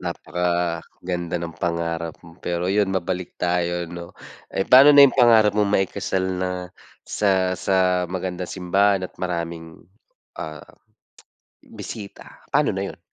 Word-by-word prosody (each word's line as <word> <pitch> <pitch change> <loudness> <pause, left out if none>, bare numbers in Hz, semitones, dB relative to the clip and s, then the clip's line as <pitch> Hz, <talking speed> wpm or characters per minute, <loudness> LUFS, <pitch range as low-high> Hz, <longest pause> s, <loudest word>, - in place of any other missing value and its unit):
Napakaganda 90 0 -3
ng 85 -1 -5
pangarap 85 -1 -2
mo. 85 +1 -15
Pero 85 0 -2
'yon, 100 0 +2
mabalik 95 -1 -3
tayo, 85 0 -1
'no. 85 0 -10 0.3
Eh, 95 - -2
paano 135 +3 +8
na 140 0 +10
'yong 140 - +4
pangarap 110 -4 +6
mong 105 0 +1
maikasal 95 -1 0 0.2
na 90 0 -1 0.5
sa 95 -3 +1
sa 90 -1 +1
magandang 90 -1 -4
simbahan 95 +1 +1
at - - -8
maraming, 85 -2 -5 0.6
ah, 75 -1 -7 1.0
bisita, 100 -3 -10
paano - - +2
na - - -3
'yon? - - -18
90 Hz, 130 wpm, -22 LUFS, 85-95 Hz, 1.0 s, na